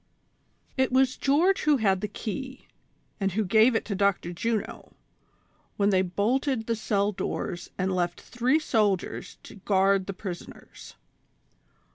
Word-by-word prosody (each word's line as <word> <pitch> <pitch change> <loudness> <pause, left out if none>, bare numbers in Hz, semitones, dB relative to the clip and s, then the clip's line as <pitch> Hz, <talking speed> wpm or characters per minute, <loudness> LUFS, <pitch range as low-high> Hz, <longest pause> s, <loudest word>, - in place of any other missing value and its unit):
T 260 - +4
was 260 0 +3
George 330 +8 +2
who 300 -2 +3
had 195 -5 +1
the 210 - -1
key, 260 +6 -6 0.5
and 195 -2 0
who 215 +2 0
gave 220 +5 +4
it - - 0
to 210 - -3
Dr. 195 -3 0
Juno, 220 +4 -3 0.8
when 205 0 +3
they 185 -1 +4
bolted 225 +7 0
the 230 - 0
cell 205 -2 0
doors 175 -2 -4
and 185 +1 0
left 175 -1 -1
three 245 +4 +1
soldiers 215 - -1
to - - -12
guard 195 -1 +2
the 195 - -3
prisoners. 185 -2 -9
210 Hz, 140 wpm, -27 LUFS, 190-250 Hz, 0.8 s, T